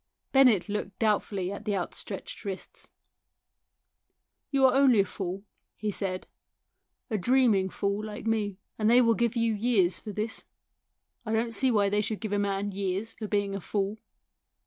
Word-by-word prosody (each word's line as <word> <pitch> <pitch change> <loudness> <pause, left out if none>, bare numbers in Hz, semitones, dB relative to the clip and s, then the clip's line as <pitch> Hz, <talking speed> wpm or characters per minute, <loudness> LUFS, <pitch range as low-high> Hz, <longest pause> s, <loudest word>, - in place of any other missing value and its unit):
Bennett 250 -9 +5
looked 205 -2 -4
doubtfully 205 -4 0
at 200 - -6
the 205 - 0
out 180 -3 -3
stretched 195 +2 -6
wrists. 195 -3 -7 1.6
"You 270 -2 +3
are 260 - +5
only 265 -6 +5
a - - 0
fool," 190 0 -5 0.3
he 215 0 -2
said, 185 -2 -3 0.4
" - - -54
a 215 - 0
dreaming 225 -3 +3
fool 200 +2 -2
like 215 0 -7
me, 210 -3 0 0.2
and 215 0 +3
they 240 +2 +7
will 230 -2 +5
give 235 +1 0
you 230 -1 +2
years 205 -5 +2
for 215 - -7
this. 215 +2 -4 0.8
I 220 -1 -3
don't 230 +1 0
see 260 +5 +3
why 205 -4 +3
they 205 +1 +2
should 215 0 -2
give 215 -2 -4
a 205 - +2
man 200 0 -1
years 195 +3 -2
for 215 - -6
being 205 -1 0
a 195 - -4
fool." 200 +3 -2
210 Hz, 175 wpm, -28 LUFS, 195-225 Hz, 1.6 s, they